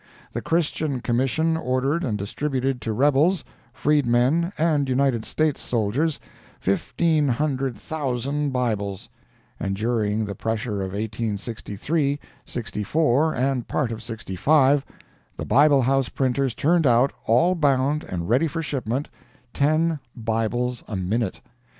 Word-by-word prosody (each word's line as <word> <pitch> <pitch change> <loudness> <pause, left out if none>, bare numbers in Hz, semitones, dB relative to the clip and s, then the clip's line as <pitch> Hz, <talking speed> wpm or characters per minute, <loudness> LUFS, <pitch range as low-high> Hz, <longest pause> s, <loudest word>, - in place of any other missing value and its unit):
The - - -3
Christian 155 -4 0
Commission 135 +7 +1
ordered 135 +2 0
and 110 -5 -1
distributed 130 +4 -2
to 110 - -2
rebels, 145 - +3 0.3
freedmen 145 +5 +2
and 150 -4 +2
United 130 -3 +1
States 155 -2 0
soldiers, 125 +8 0 0.4
fifteen 150 - +1
hundred 135 -2 -1
thousand 140 +1 -2
Bibles!—and 100 -5 -4
during 110 0 0
the 100 - -4
pressure 110 +1 -2
of 95 0 -4
1863, 110 +7 -2 0.2
'64, 135 +6 0
and 130 -1 0
part 135 -6 -1
of 110 -1 -5
'65, 130 - +2 0.5
the - - -4
Bible 145 -1 +5
House 135 +1 +2
printers 130 -2 0
turned 165 +3 +3
out, 120 +3 +4
all 125 +11 +4
bound 145 -2 +1
and 85 -2 -4
ready 130 - +3
for 165 +2 -3
shipment, 135 -2 -2 0.5
TEN 155 +2 +2 0.2
BIBLES 115 +2 -1
A 110 - -4
MINUTE! 95 +3 -1
130 Hz, 120 wpm, -24 LUFS, 115-150 Hz, 0.5 s, Bible